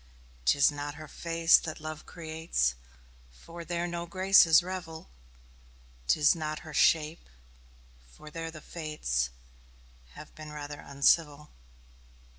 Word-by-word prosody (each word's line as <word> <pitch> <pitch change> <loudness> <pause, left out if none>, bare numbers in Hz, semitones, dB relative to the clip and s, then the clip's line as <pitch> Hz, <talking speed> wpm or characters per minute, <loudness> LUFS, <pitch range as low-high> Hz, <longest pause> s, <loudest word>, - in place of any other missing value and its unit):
'Tis 140 - +4
not 145 0 -6
her 155 0 -10
face 165 +1 +3
that 160 -2 -6
love 155 0 -8
creates, 160 - -2 0.6
For 165 - -11
there 170 0 -2
no 170 0 -4
graces 185 -2 +5
revel; 175 - -7 1.0
'Tis 150 - +4
not 155 -1 -4
her 155 - -9
shape, 155 - +2 0.8
for 150 - -13
there 165 +1 -5
the 155 -1 -10
fates 150 - -3 0.8
Have - - -12
rather 150 -1 -7
been - - -13
uncivil. 145 +1 +2
155 Hz, 115 wpm, -29 LUFS, 150-165 Hz, 1.0 s, graces